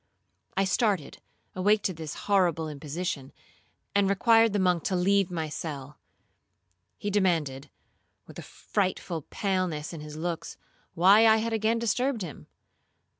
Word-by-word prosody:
I 195 - +3
started, 190 - 0 0.3
awake 205 +3 +2
to 185 - 0
this 155 -3 -7
horrible 175 -6 +2
imposition, 150 -1 -5 0.6
and 200 -1 +3
required 225 +3 +4
the 205 - 0
monk 180 -3 +2
to 190 - 0
leave 195 +1 +2
my 165 -3 -3
cell. 150 -2 -7 1.0
He 205 - -3
demanded, 165 -9 0 0.6
with - - -11
a - - -5
frightful 185 -4 -3
paleness 185 -6 -2
in 160 - -7
his 150 0 -9
looks, 170 0 -4 0.4
why 200 +6 +6
I 220 0 +6
had 225 +1 -2
again 220 +1 +1
disturbed 235 +1 0
him? 160 -5 -9
185 Hz, 135 wpm, -27 LUFS, 160-205 Hz, 1.0 s, why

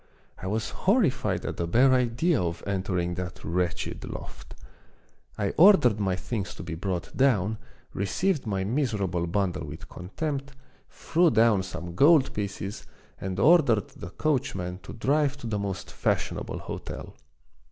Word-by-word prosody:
I 95 - -5
was 110 +3 -2
horrified 140 - +1
at - - -4
the 85 - -1
bare 130 +9 +5
idea 125 - +2
of 85 -1 -3
entering 95 -3 -1
that 90 0 -6
wretched 90 +2 -2
loft. - - -9 0.8
I 100 -2 0
ordered 160 - +6
my 95 -3 +1
things 100 0 -4
to - - -8
be 85 -1 -5
brought 90 +1 -4
down, 110 -6 +2 0.3
received 145 - 0
my 95 -2 -1
miserable 100 - -1
bundle 90 -5 -1
with 75 +3 -9
contempt, 140 - -4 0.4
threw 170 +1 +2
down 110 -5 +4
some 90 -2 -6
gold 145 - +5
pieces, 100 0 -5 0.3
and 95 0 -4
ordered 140 - +4
the 85 - -9
coachman 95 - -1
to - - -10
drive 145 +4 +1
to - - -10
the 105 -2 -2
most 100 -2 -4
fashionable - - -1
hotel. - - -7
100 Hz, 140 wpm, -27 LUFS, 90-135 Hz, 0.8 s, ordered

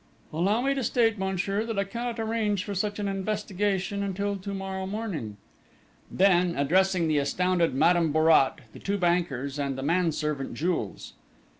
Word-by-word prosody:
"Allow 195 +8 +1
me 275 +2 +1
to 270 -2 -2
state, 225 -2 +2
monsieur, 190 +2 -1
that 225 -2 -4
I 200 - +2
cannot 235 +3 -4
arrange 220 -3 0
for 205 - -5
such 205 +2 -2
an 205 -1 -2
investigation 200 0 -1
until 200 +1 -2
to 200 +1 -6
morrow 190 -1 -4
morning!" 190 - -4 0.7
Then, 180 -2 +3
addressing 180 +4 +2
the 155 -2 +2
astounded 175 +2 +1
Madame 165 +2 +3
Bourrat, 155 -3 +4
the - - -11
two 200 +1 -1
bankers, 155 -7 0
and 140 -2 -2
the 135 - -4
manservant, 150 -4 0
Jules. 165 - -3
190 Hz, 155 wpm, -27 LUFS, 165-205 Hz, 0.7 s, Bourrat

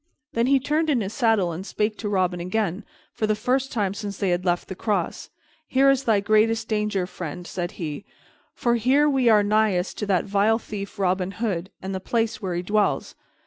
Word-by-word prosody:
Then 230 +1 +1
he 275 0 +4
turned 305 +4 0
in 275 -5 +3
his 200 +1 -4
saddle 225 -9 +2
and 165 +3 -5
spake 210 +1 -1
to 210 - -3
Robin 185 -3 +1
again, 190 +2 -1 0.3
for 215 - -1
the 215 - +2
first 255 +5 0
time 200 -4 0
since 200 -1 -5
they 195 -2 0
had 175 +1 0
left 175 -1 0
the - - -5
cross. 200 -3 -2 0.4
"Here 270 +1 +4
is 270 0 0
thy 215 -3 +3
greatest 220 +2 +2
danger, 210 -3 0
friend," 175 -1 -7
said 175 -1 -4
he, 155 +1 -5 0.5
"for 240 - +1
here 265 +6 +3
we 265 -4 +3
are 210 -2 +6
nighest 205 -3 +1
to 210 - -2
that 190 -3 +2
vile 205 +2 +2
thief 205 -2 -7
Robin 185 -1 0
Hood, 195 -6 -2
and 190 +1 -4
the 190 - -2
place 225 +3 -1
where 185 -3 -2
he 175 - -2
dwells. 210 +3 0
210 Hz, 205 wpm, -24 LUFS, 185-225 Hz, 0.5 s, are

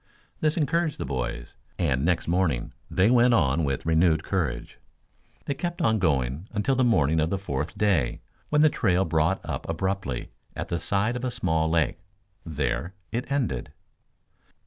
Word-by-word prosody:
This 155 +1 +1
encouraged 165 +1 +1
the - - -4
boys, - - -4 0.2
and 70 -7 +1
next 85 0 +1
morning 85 -8 0 0.2
they 95 +5 +3
went 120 -1 +5
on 75 -4 +2
with 70 -1 -2
renewed 80 0 +3
courage. 85 -10 -2 0.7
They 140 - -1
kept 175 +4 -4
on 110 -1 +2
going 70 -1 0
until 105 +6 +1
the 130 0 +2
morning 80 - +3
of 80 +1 +1
the 100 - 0
fourth 75 -4 -4
day 90 -13 +1 0.3
when 150 0 +3
the 155 - +7
trail 95 +1 +2
brought 80 +3 +1
up - - -4
abruptly 90 -6 -2 0.2
at - - -5
the 85 - -1
side 100 +6 0
of 125 - -4
a 130 - 0
small 80 -8 0
lake. 80 -5 +1 0.4
There 75 +2 -2 0.2
it 120 +5 -3
ended. 120 - -1
85 Hz, 165 wpm, -26 LUFS, 75-110 Hz, 0.7 s, the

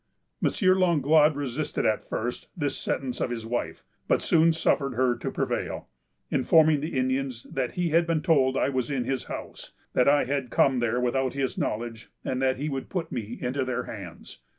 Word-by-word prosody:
M. - - +4 0.3
Langlade 155 -3 +4
resisted, 145 +1 -2
at 110 - +1
first, 120 +2 -4
this 145 -3 -1
sentence 130 -3 -3
of - - 0
his 115 -2 -4
wife, 120 +1 -3 0.2
but - - +3
soon 165 0 +4
suffered 140 -5 +1
her 125 0 +2
to - - -4
prevail, - - -3 0.4
informing 160 -2 +4
the 150 -1 -3
Indians 130 -2 -1
that 130 -2 -3
he 175 -1 0
had 165 +2 +3
been 165 -2 0
told 135 -6 +3
I - - +2
was 130 -3 -1
in 135 -3 -1
his 130 +1 -2
house; - - -8 0.2
that 125 - +4
I 145 -1 +4
had 135 -1 -2
come 130 +1 +3
there 120 0 0
without 130 +1 0
his 135 -1 -2
knowledge, 115 +1 -3 0.2
and 130 0 -1
that 130 -1 +2
he 145 +3 -3
would 135 -3 -4
put 175 -3 -3
me 115 -1 -4
into 130 +2 -1
their 125 -1 -2
hands. 95 -8 -9
130 Hz, 190 wpm, -27 LUFS, 125-150 Hz, 0.4 s, M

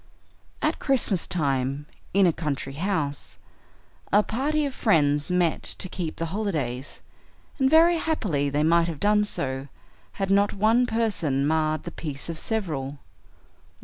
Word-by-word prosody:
At - - +1
Christmastime, 145 - 0 0.3
in 195 0 +4
a 170 - +3
country 140 -4 -3
house, 150 -4 -2 0.7
a 205 +1 +5
party 295 +7 0
of 275 - -3
friends 150 - +2
met 180 -3 +1 0.2
to 185 - -1
keep 175 -3 -4
the 165 - -3
holidays, 150 - -3 0.6
and 265 0 +4
very 335 +3 +6
happily 180 - 0
they 145 +2 0
might 165 +1 +4
have 165 -4 -5
done 210 0 +3
so 135 -8 -4 0.5
had 195 -1 -2
not 200 +1 +3
one 225 +5 +3
person 180 - 0
marred 155 0 +1
the 170 - -6
peace 150 -2 -6
of 165 -2 -3
several. 150 - -3
170 Hz, 140 wpm, -25 LUFS, 145-210 Hz, 0.7 s, very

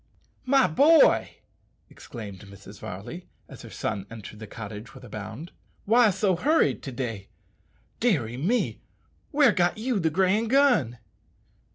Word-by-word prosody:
"My 270 0 +5
boy," 300 - +4 0.5
exclaimed 105 -6 -10
Mrs. 100 -1 -13
Varley, - - -8 0.2
as - - -12
her - - -11
son 100 0 -4
entered 110 -1 -10
the 110 - -9
cottage 105 +2 -9
with 130 - -13
a 125 - -11
bound, 110 - -8 0.3
"why 230 +1 +5
so 190 -1 +1
hurried 300 - +2
to 135 - -7
day? 115 -6 -5 0.7
Deary 145 - 0
me! 190 - -1 0.5
where 285 -5 +4
got 175 -1 +1
you 230 0 -1
the 165 -3 +1
grand 190 +7 +1
gun?" 245 - +3
165 Hz, 140 wpm, -26 LUFS, -, 0.7 s, My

